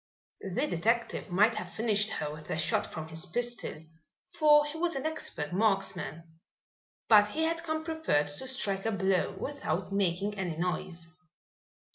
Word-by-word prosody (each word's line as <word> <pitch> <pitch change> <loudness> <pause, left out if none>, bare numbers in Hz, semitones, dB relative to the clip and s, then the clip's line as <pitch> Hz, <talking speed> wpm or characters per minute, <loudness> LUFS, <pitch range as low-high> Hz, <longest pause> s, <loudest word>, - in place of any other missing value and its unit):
The 270 - +2
detective 230 - 0
might 210 +6 +3
have - - -6
finished 215 -1 +2
her 150 -8 -3
with 150 0 -11
a - - -1
shot - - +1
from 160 0 -7
his 160 0 -6
pistol, 240 -4 -3 0.5
for 295 -1 +6
he 295 +1 -6
was 335 0 -1
an 270 - -3
expert 245 - -2
marksman. 180 -5 -1 0.7
But 210 -2 +7
he 310 +10 -2
had 330 +1 0
come 315 -1 -2
prepared 315 - 0
to 145 - -5
strike 205 -6 +1
a - - +1
blow 195 -2 +1
without 195 - -3
making 200 +1 0
any 175 -4 -2
noise. 175 -1 -3
205 Hz, 155 wpm, -30 LUFS, 170-265 Hz, 0.7 s, But